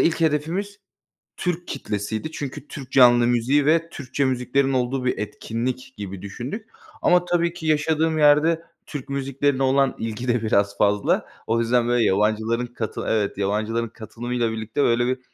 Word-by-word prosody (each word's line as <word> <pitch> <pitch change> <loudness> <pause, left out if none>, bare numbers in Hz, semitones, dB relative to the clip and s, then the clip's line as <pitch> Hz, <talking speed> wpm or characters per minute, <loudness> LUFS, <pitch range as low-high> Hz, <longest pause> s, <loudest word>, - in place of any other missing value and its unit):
ilk 165 0 +2
hedefimiz 165 +7 -1 0.6
Türk 180 -1 -3
kitlesiydi 110 +2 -3
çünkü 140 -1 -6
Türk 130 -3 -9
canlı 120 -2 +6
müziği 125 +4 +2
ve 165 +2 +3
Türkçe 140 -1 -2
müziklerin 135 +1 +1
olduğu 130 0 0
bir 125 - 0
etkinlik 120 +5 -4
gibi 100 -3 -7
düşündük. 125 - -6 0.3
Ama 180 0 +4
tabii 170 -1 +1
ki 170 -2 -7
yaşadığım 155 +1 +1
yerde 155 +2 +4 0.2
Türk 145 -3 -7
müziklerine 140 0 0
olan 135 0 +3
ilgi 115 +2 -4
de 120 -1 +1
biraz 100 -2 +1
fazla. 105 0 +2 0.2
O 115 +1 +1
yüzden, 120 +1 +2
böyle, 120 -1 +3
yabancıların 110 +4 +1
katılı 120 -2 -5
Evet. 105 -3 0
Yabancıların 110 +4 -1
katılımıyla 120 +2 -3
birlikte, 110 +5 -2
böyle, 120 -1 +3
bir, 130 +1 0
125 Hz, 155 wpm, -23 LUFS, 115-150 Hz, 0.6 s, canlı